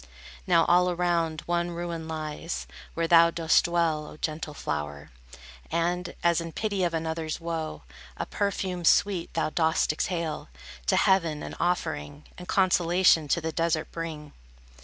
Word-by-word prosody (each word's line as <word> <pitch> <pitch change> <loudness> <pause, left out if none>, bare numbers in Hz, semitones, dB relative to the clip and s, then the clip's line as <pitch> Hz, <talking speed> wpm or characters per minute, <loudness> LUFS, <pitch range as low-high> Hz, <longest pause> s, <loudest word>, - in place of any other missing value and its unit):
Now 170 -2 +5
all 180 +1 +4
around, 170 -3 0
one 175 0 -1
ruin 170 -1 -5
lies, 155 +1 -4 0.3
Where 165 0 0
thou 170 0 +7
dost 165 -1 +3
dwell, 165 -3 0
O - - -11
gentle 155 -1 -4
flower, 75 - -4 0.6
And, 175 +1 -1
as 170 -1 +3
in 165 -1 -7
pity 205 -4 -1
of 170 -2 0
another's 160 -1 -3
woe, 160 - -4 0.3
A - - -2
perfume 190 -3 -2
sweet 190 0 +3
thou 160 -1 0
dost 160 -1 +2
exhale, 165 - -3 0.4
To - - +3
heaven 170 -6 +2
an - - -6
offering, 155 -4 -2
And 180 - -10
consolation 175 -3 +3
to 170 +4 +1
the 160 0 -2
desert 165 -1 -1
bring. 155 -3 -6
165 Hz, 145 wpm, -27 LUFS, 160-175 Hz, 0.6 s, thou